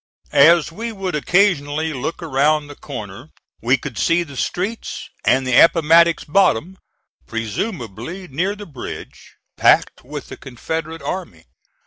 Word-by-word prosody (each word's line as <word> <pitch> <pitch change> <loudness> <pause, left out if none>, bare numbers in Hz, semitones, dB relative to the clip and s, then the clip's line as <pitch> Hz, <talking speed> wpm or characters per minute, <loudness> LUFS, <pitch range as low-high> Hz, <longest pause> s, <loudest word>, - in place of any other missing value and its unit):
As 165 +3 +6
we 230 +7 -5
would 195 -4 -4
occasionally 155 -2 +1
look 140 +6 -4
around 150 0 +2
the 145 0 -11
corner 120 -1 -8 0.3
we 125 +4 +3
could 125 -3 -7
see 170 +1 +2
the 140 -4 -12
streets 190 - -3 0.2
and 130 0 +3
the 130 - -1
Appomattox 165 +2 +5
bottom, 185 - +1 0.5
presumably 120 - -5
near 180 +9 -1
the 205 0 -9
bridge, 140 -8 -9 0.2
packed - - +3
with - - -8
the - - -8
Confederate 160 +5 -5
army. 125 - -5
155 Hz, 130 wpm, -20 LUFS, 130-180 Hz, 0.5 s, As